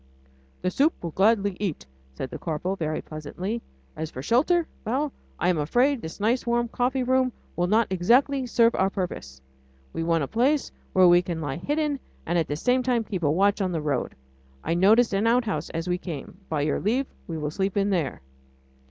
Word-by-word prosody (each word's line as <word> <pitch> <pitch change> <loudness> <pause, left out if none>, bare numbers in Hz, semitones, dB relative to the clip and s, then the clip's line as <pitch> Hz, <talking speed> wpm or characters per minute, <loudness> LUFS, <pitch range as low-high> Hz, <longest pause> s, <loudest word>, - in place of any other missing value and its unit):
"The 185 - +1
soup 295 - +3
we'll 170 - -5
gladly 200 +1 +2
eat," 195 -7 -3 0.3
said 130 - -5
the - - -6
corporal 175 +4 -2
very 155 -4 -3
pleasantly. 180 +9 -5 0.3
"As 160 0 -4
for 130 - -7
shelter... 315 - +3 0.2
well! 265 +6 -1 0.2
I - - 0
am 175 -4 +2
afraid 245 - +2
that - - -13
this 160 - -7
nice 230 +5 +1
warm 235 0 +1
coffee 250 +2 0
room 255 0 +2 0.2
will 175 0 +1
not 220 +4 +3
exactly 250 +9 +3
serve 230 0 +4
our 190 - +2
purpose. 65 - -5 0.5
We - - -3
want 165 -2 +1
a - - -2
place 265 - +1 0.2
where 185 -1 +6
we 175 0 +6
can 175 -2 -4
lie 145 -4 -3
hidden, 295 - -1 0.3
and 170 +1 +1
at 160 - 0
the 145 - -2
same 250 +11 +2
time 245 -2 +1
keep 195 -4 -4
a 150 - +2
watch 200 +6 +2
on 185 -2 0
the 165 - 0
road. 145 -4 -1 0.5
I - - 0
noticed 210 +6 +4
an 200 +3 +2
outhouse 235 -2 +1
as 165 +1 -4
we 180 0 0
came. 165 -3 -7
By 155 -2 0
your 145 0 0
leave 245 +7 +1 0.2
we 165 - -4
will 150 -1 -3
sleep 195 +3 -1
in 200 0 +2
there." 165 - -1
195 Hz, 205 wpm, -26 LUFS, 165-245 Hz, 0.5 s, where